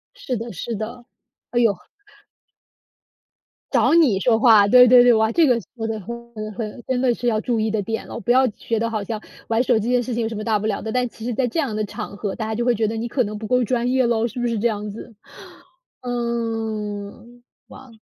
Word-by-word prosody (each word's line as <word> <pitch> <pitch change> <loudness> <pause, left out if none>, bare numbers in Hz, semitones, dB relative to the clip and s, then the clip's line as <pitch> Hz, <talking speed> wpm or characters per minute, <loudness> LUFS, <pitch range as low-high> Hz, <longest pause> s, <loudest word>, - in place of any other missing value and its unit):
是 255 - -4
的， 230 +2 -6
是 230 +7 -5
的， 235 +3 -6 0.5
唉 240 - +1
哟。 215 -6 +3 1.9
找 - - +3
你 275 - +4
说 225 +1 +2
话， 220 -5 +6
对 250 +3 +8
对 245 0 +8
对， 245 -1 +6
哇， 220 0 +2
这 330 +2 +4
个 245 -2 +3 0.2
说 225 -2 -4
的 220 -1 -3
很 235 +3 -9
很 215 -1 -6
很 225 +2 -6
真 255 -1 0
的 250 -2 +3
是 245 +1 -4
要 215 -2 +1
注 235 -2 -1
意 220 0 0
的 215 -2 0
点 225 +3 -4
了， - - -6
不 240 - 0
要 260 +1 +5
觉 220 +1 -3
得 230 - -1
好 215 -3 -3
像 215 +2 -5 0.3
玩 225 +1 +2
手 245 -3 +2
机 240 +4 -1
的 245 - +3
事 245 0 -4
情 235 0 -1
有 225 - -1
什 225 - -6
么 215 - -4
大 215 -2 +1
不 215 - -5
了 205 - -2
的， 220 - -4
但 250 0 0
其 225 - -10
实 245 - -2
在 250 +2 0
这 325 - -2
样 260 -8 -1
的 215 - -1
场 200 - -7
合， 200 -2 -3
大 220 - -4
家 220 0 -3
就 240 - -1
会 245 - +3
觉 220 0 0
得 225 - -3
你 230 +2 -3
可 250 +1 0
能 210 0 -5
不 215 0 -6
够 250 +1 +2
专 245 +1 0
业 260 -1 +2
了， 235 0 +1
是 245 +2 -7
不 240 - 0
是 230 -3 -1
这 235 - +2
样 210 -1 -3
子？ 225 +2 -10 0.9
嗯， 230 -2 -4 0.2
哇。 260 -3 -14
230 Hz, 265 characters per minute, -22 LUFS, 215-245 Hz, 1.9 s, 对